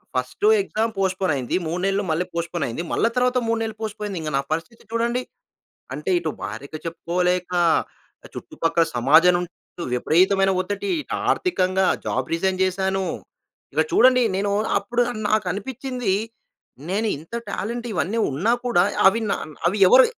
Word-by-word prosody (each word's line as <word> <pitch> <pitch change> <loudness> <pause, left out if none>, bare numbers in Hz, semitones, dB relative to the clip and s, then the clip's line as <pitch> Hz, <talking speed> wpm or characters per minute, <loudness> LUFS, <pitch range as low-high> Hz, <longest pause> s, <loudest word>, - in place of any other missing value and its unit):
First 415 - 0
exam 225 - -1
postpone 190 -1 +1
అయింది. 125 -3 -2
3 170 +3 -2
నెలలు 195 +1 +1
మళ్ళీ 165 +3 0
పోస్ట్‌పోన్ 170 -1 -2
అయింది. 120 +8 -4
మళ్ళా 230 - +2
తర్వాత 250 0 +2
3 230 0 +1
నెలలు 220 -1 -3
పోస్ట్‌పోనైంది. 210 -3 -4
ఇంక 155 -1 -4
నా - - +1
పరిస్థితి 165 +9 -3
చూడండి. 235 +2 0 0.7
అంటే, 150 +6 -4
ఇటు 165 -2 -2
భార్యకి 110 +10 -6
చెప్పుకోలేక, 180 +2 -1 0.8
చుట్టుపక్కల 170 - 0
సమాజం 155 +9 +5
నుండి 175 0 -5 0.4
విపరీతమైన 190 +9 +3
ఒత్తిడి, 205 - -4
ఇటు - - -5 0.2
ఆర్థికంగా 190 - +1 0.2
జాబ్ 130 0 -2
రిజైన్ 185 +2 0
చేశాను. 190 +1 0 0.7
ఇక - - +3
చూడండి, 255 -9 +5
నేను 200 +1 0 0.3
అప్పుడు 240 0 -1 0.3
నాకు 215 -2 +2
అనిపించింది, 250 +1 -3 0.8
నేను 210 +4 0
ఇంత 165 +10 -9
టాలెంట్ 235 +4 -4
ఇవన్నీ 195 +6 -1
ఉన్నా 175 - +1
కూడా, 205 -8 +4 0.2
అవి 220 +4 +3
నా - - +2 0.3
అవి 190 +4 0
ఎవరు 255 +7 +8
190 Hz, 145 wpm, -23 LUFS, 170-225 Hz, 0.8 s, ఎవరు